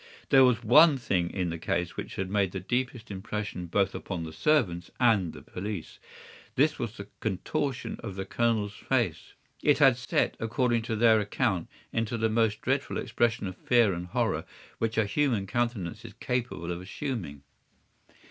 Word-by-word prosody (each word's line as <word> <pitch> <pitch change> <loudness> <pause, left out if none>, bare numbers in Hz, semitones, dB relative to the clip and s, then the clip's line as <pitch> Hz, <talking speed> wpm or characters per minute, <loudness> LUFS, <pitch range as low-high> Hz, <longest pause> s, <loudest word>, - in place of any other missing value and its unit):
"There 135 -2 +7
was 125 -2 +3
one 150 +6 +7
thing 90 -8 0
in 90 -3 -2
the 85 - -5
case 90 +1 -1
which - - -6
had 95 - -2
made 100 -1 0
the 95 - -2
deepest 120 +3 -2
impression 100 -2 -4
both 100 +3 +1
upon 90 -4 -4
the 80 -1 -7
servants 90 - +1
and 110 -9 +3
the - - -12
police. 95 -2 -6 0.6
This 150 +4 +3
was 115 -1 -4
the 100 - -7
contortion 120 +7 -2
of 100 -5 -6
the 95 0 -4
Colonel's 110 -3 0
face. 115 - -1 0.3
It - - +4
had - - +6
set, - - 0
according 115 +1 +1
to 110 - 0
their 110 0 +5
account, 105 -4 0 0.3
into 115 +1 -1
the 110 0 +1
most 110 -1 +1
dreadful 135 +2 -1
expression 115 -2 0
of 95 -1 -5
fear 120 -3 +3
and 90 +1 -5
horror - - 0 0.4
which 115 -1 -1
a 110 - +4
human 115 -2 +1
countenance 115 -5 -2
is - - -10
capable 120 -9 -3
of 85 0 -4
assuming. 95 - -5
110 Hz, 170 wpm, -28 LUFS, 95-120 Hz, 0.6 s, There